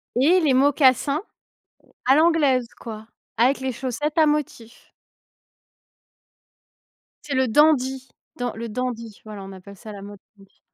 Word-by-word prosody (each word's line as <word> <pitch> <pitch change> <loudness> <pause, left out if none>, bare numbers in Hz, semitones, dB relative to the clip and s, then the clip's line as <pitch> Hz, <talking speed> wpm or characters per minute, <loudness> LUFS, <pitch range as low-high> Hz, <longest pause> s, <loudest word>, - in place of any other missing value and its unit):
et 305 +9 +4
les 305 -6 +2
mocassins, 275 +1 +3 0.8
à 265 +2 +5
l'anglaise 295 -6 +3
quoi, 220 -2 -9 0.3
avec 250 +5 +3
les 265 0 -2
chaussettes 270 +5 -4
à 320 - +6
motifs. 290 -6 -4 2.3
C'est 290 - -5
le 260 0 +2
dandy, 265 0 +2 0.3
dans 245 -1 -3
le 230 +1 -6
dandy, 230 -2 -5
voilà, 210 -2 -9
on 195 - -10
appelle 195 +1 -12
ça 215 +2 -10
la 200 -1 -9
mode, 205 0 -11 0.2
oui. 195 -1 -22
255 Hz, 135 wpm, -23 LUFS, 220-285 Hz, 2.3 s, à